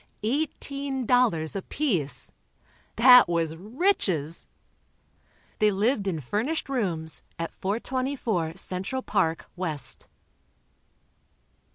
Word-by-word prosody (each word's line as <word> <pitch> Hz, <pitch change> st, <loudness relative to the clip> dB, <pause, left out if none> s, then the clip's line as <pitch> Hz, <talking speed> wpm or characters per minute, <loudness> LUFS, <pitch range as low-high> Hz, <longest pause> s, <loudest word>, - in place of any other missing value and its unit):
Eighteen 275 Hz, +1 st, -2 dB
dollars 220 Hz, -11 st, +2 dB
apiece. 190 Hz, -, -1 dB, 0.6 s
That 250 Hz, -1 st, +8 dB
was 165 Hz, -2 st, 0 dB
riches. 190 Hz, -, 0 dB, 1.1 s
They 215 Hz, -, +5 dB
lived 205 Hz, +2 st, +1 dB
in 170 Hz, -5 st, -1 dB
furnished 230 Hz, -, -2 dB
rooms, 175 Hz, -, -2 dB, 0.2 s
at 165 Hz, 0 st, -4 dB
424 225 Hz, -, -2 dB
Central 190 Hz, +7 st, -3 dB
Park, 165 Hz, 0 st, 0 dB
West. 160 Hz, -7 st, -3 dB
205 Hz, 80 wpm, -26 LUFS, 165-260 Hz, 1.1 s, That